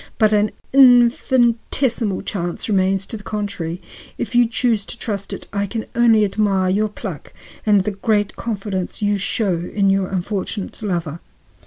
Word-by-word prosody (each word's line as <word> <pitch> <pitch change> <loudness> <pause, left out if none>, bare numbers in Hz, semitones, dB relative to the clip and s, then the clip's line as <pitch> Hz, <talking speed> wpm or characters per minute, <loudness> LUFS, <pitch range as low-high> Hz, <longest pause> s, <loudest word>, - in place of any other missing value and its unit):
But 215 -1 +3
an 210 0 +3 0.2
infinitesimal 240 -3 +3
chance 175 -3 -4
remains 195 -2 +1
to 225 - -6
the 205 - -13
contrary. 200 -6 -4 0.4
If - - -4
you 240 -1 +5
choose 230 -2 0
to - - -7
trust 200 -4 -4
to - - -3
it, - - -12
I 200 0 -1
can 220 +3 -4
only 230 -3 +4
admire 195 -2 +1
your 210 +3 +1
pluck 195 - -8 0.3
and 205 -3 +4
the 210 - -1
great 205 +1 0
confidence 200 -3 -4
you 205 0 +2
show 195 -1 0
in 195 -2 +2
your 195 -1 +1
unfortunate 195 +2 -4
lover." 170 -6 -3
205 Hz, 160 wpm, -20 LUFS, 195-225 Hz, 0.4 s, you